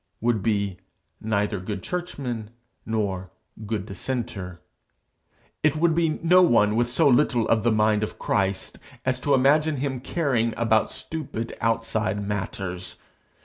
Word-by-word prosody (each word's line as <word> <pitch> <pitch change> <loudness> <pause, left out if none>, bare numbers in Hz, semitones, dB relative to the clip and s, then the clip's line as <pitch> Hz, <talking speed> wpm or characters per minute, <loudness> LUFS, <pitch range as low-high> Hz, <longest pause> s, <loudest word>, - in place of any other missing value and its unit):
would 115 -2 +1
be 100 -3 0 0.4
neither 105 -2 0
'good 95 0 -5
churchman' 130 -11 -4 0.4
nor 100 -4 -2 0.4
'good 105 -2 -2
dissenter.' 100 -5 -4 1.0
It 155 -1 +3
would 165 +1 +3
be 165 0 +2
no 180 +2 +6
one 110 -10 +4
with 120 +1 +2
so 125 - +3
little 120 -3 +3
of 115 -1 +3
the 120 - +2
mind 105 -1 +3
of 110 - -3
Christ 95 -1 -1 0.3
as 130 0 +1
to 140 +2 +2
imagine 150 +4 +3
him 135 -1 -2
caring 130 -6 0
about 110 -1 +2
stupid 130 -8 -4
outside 115 -2 0
matters. 95 -3 -4
115 Hz, 135 wpm, -25 LUFS, 105-130 Hz, 1.0 s, no